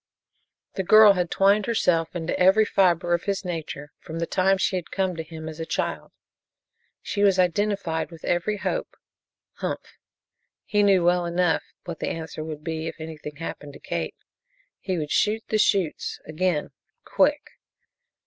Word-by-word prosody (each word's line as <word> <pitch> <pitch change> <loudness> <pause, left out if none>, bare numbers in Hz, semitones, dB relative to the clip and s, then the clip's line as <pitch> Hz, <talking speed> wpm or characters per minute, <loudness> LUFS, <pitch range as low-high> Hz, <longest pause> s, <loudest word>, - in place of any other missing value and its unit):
The 190 - -2
girl 215 +2 +8
had 180 -2 -1
twined 200 +2 +3
herself 175 -8 +1
into 165 -1 -2
every 190 +4 +5
fiber 175 -4 +2
of 170 - 0
his 200 -1 -2
nature 155 -4 -5
from 160 - -8
the 165 - -1
time 190 +2 +2
she 190 - 0
had 180 -2 -4
come 190 -2 -1
to 165 - -4
him 160 0 -8
as 160 0 -8
a - - -2
child. - - -3 0.9
She 205 - -2
was 195 -2 +4
identified 185 -2 0
with 165 -2 -11
every 190 +5 0
hope. - - -3 0.6
Humph! - - -5 0.7
He 205 0 +2
knew 195 -4 +4
well 175 0 +3
enough 170 -2 +1 0.2
what 170 -2 -7
the - - -2
answer 160 -1 -5
would 155 -1 -7
be 160 0 -3
if - - -5
anything 155 -2 -7
happened 145 -2 -7
to - - -12
Kate. - - -4 0.6
He 185 -2 -2
would 150 -2 -3
shoot 220 +1 +2
the 215 - +1
chutes, 195 -7 +1
again 160 -1 -1 0.3
quick. - - +1
175 Hz, 165 wpm, -25 LUFS, 160-195 Hz, 0.9 s, girl